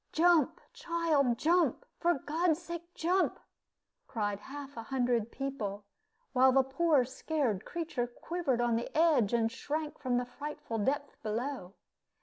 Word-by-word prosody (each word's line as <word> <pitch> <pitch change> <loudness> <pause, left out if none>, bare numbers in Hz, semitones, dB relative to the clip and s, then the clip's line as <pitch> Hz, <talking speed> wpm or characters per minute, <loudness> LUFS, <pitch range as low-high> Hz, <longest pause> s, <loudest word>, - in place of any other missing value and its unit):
"Jump, 335 -3 +4
child, 310 -8 +1
jump! 350 - +2
for 345 0 +3
God's 320 +4 0
sake, 340 0 -7
jump!" 365 +3 +1 0.7
cried 205 -3 -2
half 280 +4 -9
a 230 - -5
hundred 240 -2 0
people, 215 -8 -4 0.5
while 260 0 +6
the 265 +1 +5
poor 275 0 +2
scared 260 - -1
creature 310 -8 -2
quivered 265 0 -2
on 240 -1 +2
the 235 - -3
ledge, 305 -10 +4
and 230 -1 +2
shrank 300 +4 -4
from 255 -3 0
the 245 - 0
frightful 245 -3 -5
depth 280 +6 -1
below. 220 -3 -3
270 Hz, 135 wpm, -32 LUFS, 240-320 Hz, 0.7 s, while